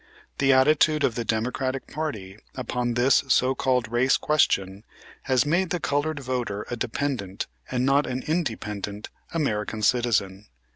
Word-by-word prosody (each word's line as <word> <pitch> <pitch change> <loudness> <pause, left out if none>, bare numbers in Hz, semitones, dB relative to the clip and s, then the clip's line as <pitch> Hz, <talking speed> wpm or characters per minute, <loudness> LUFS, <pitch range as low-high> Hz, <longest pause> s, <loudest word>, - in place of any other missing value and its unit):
The 135 -1 +4
attitude 150 +3 +4
of 125 - +2
the 120 - -3
Democratic 125 +4 -2
party 110 -11 -5 0.2
upon 125 -1 -2
this 125 +4 +4
so 130 0 +3
called 125 -3 0
race 125 +3 +3
question 100 -10 +1 0.5
has 130 +1 +3
made 170 +4 +1
the 175 - -1
colored 145 0 -1
voter 120 -6 -3
a - - -1
dependent, 115 -5 -3 0.2
and 125 0 0
not 140 +2 +3
an 130 0 -3
independent, 105 - -3 0.2
American 110 -8 -2
citizen. 105 -4 +1
125 Hz, 140 wpm, -25 LUFS, 110-140 Hz, 0.5 s, The